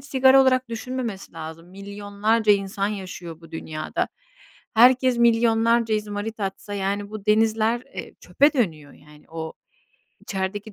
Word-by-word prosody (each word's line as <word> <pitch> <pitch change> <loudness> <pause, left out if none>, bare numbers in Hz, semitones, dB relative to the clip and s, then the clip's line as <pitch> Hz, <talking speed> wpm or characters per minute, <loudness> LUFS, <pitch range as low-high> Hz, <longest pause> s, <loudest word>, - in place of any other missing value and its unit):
sigara 270 -1 +5
olarak 255 -1 +2
düşünmemesi 230 -3 -5
lazım, 165 +1 -9
milyonlarca 205 +3 0
insan 195 0 -1
yaşıyor 180 -5 -7
bu 165 - -15
dünyada. 155 -1 -3 0.7
Herkes 250 +1 +5
milyonlarca 230 -1 +3
izmarit 210 +1 -4
atsa, 200 +1 -4
yani, 200 +1 -2
bu 215 -2 -8
denizler, 220 +2 +2
eee, - - -9
çöpe 290 +2 +3
dönüyor, 160 - -1
yani. 150 0 -18
O, 160 -1 -5 0.7
içerideki 200 +2 -4
210 Hz, 125 wpm, -24 LUFS, 190-230 Hz, 0.7 s, sigara